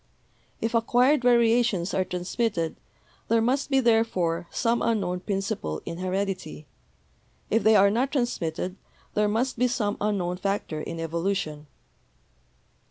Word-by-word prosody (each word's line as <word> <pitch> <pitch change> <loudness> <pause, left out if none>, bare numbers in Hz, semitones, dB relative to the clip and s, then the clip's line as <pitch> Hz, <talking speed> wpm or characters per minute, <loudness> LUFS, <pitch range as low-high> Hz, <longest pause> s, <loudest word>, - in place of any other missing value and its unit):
If 225 +1 -2
acquired 245 +5 +3
variations 235 -6 +3
are 190 - +2
transmitted, 180 -1 -2 0.5
there 230 0 +3
must 265 +5 0
be, 270 -1 +3
therefore, 190 -8 +1
some 235 0 0
unknown 190 -6 0
principle 195 - -3
in 170 - -6
heredity; 185 -4 -3 0.9
if 225 - +3
they 220 0 +5
are 200 0 +6
not 255 +6 0
transmitted, 185 - -2 0.4
there 210 0 +2
must 230 +4 -1
be 250 - +4
some 215 -4 -1
unknown 190 -4 -1
factor 195 -5 -2
in 165 - -6
evolution." 165 -2 -2
205 Hz, 125 wpm, -26 LUFS, 180-235 Hz, 0.9 s, are